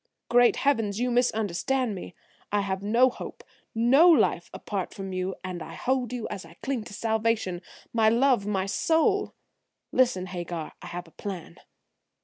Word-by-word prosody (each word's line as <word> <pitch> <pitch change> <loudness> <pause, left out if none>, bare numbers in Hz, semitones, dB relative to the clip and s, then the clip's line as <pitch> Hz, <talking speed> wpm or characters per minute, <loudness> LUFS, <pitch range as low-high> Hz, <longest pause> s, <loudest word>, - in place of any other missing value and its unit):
"Great 245 0 +5
heavens! 225 -7 +1
You 250 0 0
misunderstand 235 +1 +1
me. 180 -2 -8 0.4
I 205 0 +2
have 190 -1 -2
no 230 +5 +4
hope, - - -9 0.3
no 265 +10 +6
life, 330 - +3
apart 195 -3 -4
from 195 -1 -6
you, 185 +1 -2
and 180 -2 -5
I - - -8
hold 255 -2 -1
you 245 -3 -3
as 190 - -5
I 165 0 -15
cling 260 -5 -2
to - - -10
salvation, 220 -5 0 0.3
my 220 -2 +4
love, 240 -3 +3
my 190 -2 0
soul! 325 - +1 0.6
Listen, 240 -8 +2
Hagar, 175 -3 -5
I - - -8
have 175 0 -6
a - - -18
plan." 190 -2 -7
220 Hz, 160 wpm, -27 LUFS, 190-245 Hz, 0.6 s, no